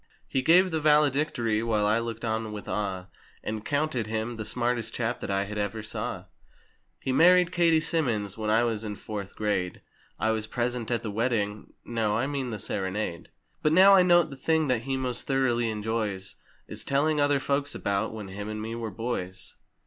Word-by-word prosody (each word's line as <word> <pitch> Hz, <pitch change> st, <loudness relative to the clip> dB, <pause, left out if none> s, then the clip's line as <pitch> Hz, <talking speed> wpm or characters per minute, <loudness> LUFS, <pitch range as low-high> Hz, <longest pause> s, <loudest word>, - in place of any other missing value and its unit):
He 130 Hz, -, 0 dB
gave 180 Hz, +6 st, +5 dB
the 160 Hz, -, 0 dB
"valedictory" 145 Hz, -7 st, +2 dB
while 110 Hz, -2 st, +1 dB
I 105 Hz, +2 st, +3 dB
looked 115 Hz, 0 st, -4 dB
on 110 Hz, -1 st, -2 dB
with 105 Hz, -2 st, -7 dB
awe, 95 Hz, -3 st, -2 dB, 0.4 s
And 110 Hz, 0 st, -4 dB
counted 140 Hz, -5 st, -1 dB
him, 110 Hz, +2 st, -3 dB
'The 110 Hz, -, -4 dB
smartest 120 Hz, 0 st, -1 dB
chap 120 Hz, 0 st, -1 dB
that -, -, -5 dB
I 100 Hz, 0 st, +1 dB
had 105 Hz, +1 st, -5 dB
ever 105 Hz, +1 st, -2 dB
saw.' 105 Hz, -, -4 dB, 0.8 s
He 130 Hz, -, -2 dB
married 180 Hz, +5 st, +5 dB
Katie 170 Hz, -2 st, +4 dB
Simmons 120 Hz, -, -1 dB
when 110 Hz, -1 st, -3 dB
I 110 Hz, +2 st, +4 dB
was 115 Hz, -2 st, -1 dB
in 105 Hz, -1 st, -4 dB
"Fourth 100 Hz, -2 st, -6 dB
Grade"— 100 Hz, -4 st, -1 dB, 0.4 s
I 110 Hz, -, +1 dB
was 110 Hz, -1 st, -2 dB
present 120 Hz, 0 st, -2 dB
at 120 Hz, -2 st, -1 dB
the 110 Hz, -, -3 dB
wedding—no, 110 Hz, 0 st, -1 dB
I 120 Hz, -, +1 dB
mean 135 Hz, -3 st, -2 dB
the 110 Hz, -, -4 dB
sere¬ 95 Hz, -1 st, -3 dB
nade. 95 Hz, -4 st, -4 dB, 0.3 s
But 150 Hz, -, +2 dB
now 190 Hz, +3 st, +8 dB
I 195 Hz, -, +8 dB
note 175 Hz, -3 st, +4 dB
the -, -, -7 dB
thing 160 Hz, +2 st, +1 dB
that 120 Hz, -2 st, 0 dB
he 135 Hz, -1 st, -1 dB
most 125 Hz, -2 st, -3 dB
thoroughly 120 Hz, -4 st, +1 dB
enjoys 105 Hz, -3 st, -2 dB, 0.3 s
Is -, -, -3 dB
telling 150 Hz, +2 st, +1 dB
other 145 Hz, -1 st, +3 dB
folks 140 Hz, +1 st, -1 dB
about, 100 Hz, +2 st, -1 dB
"When 105 Hz, -3 st, -7 dB
him 100 Hz, +2 st, -6 dB
and 110 Hz, 0 st, -4 dB
me 110 Hz, +1 st, -4 dB
were 115 Hz, -1 st, -4 dB
boys!" 95 Hz, -6 st, -4 dB
115 Hz, 195 wpm, -27 LUFS, 105-140 Hz, 0.8 s, now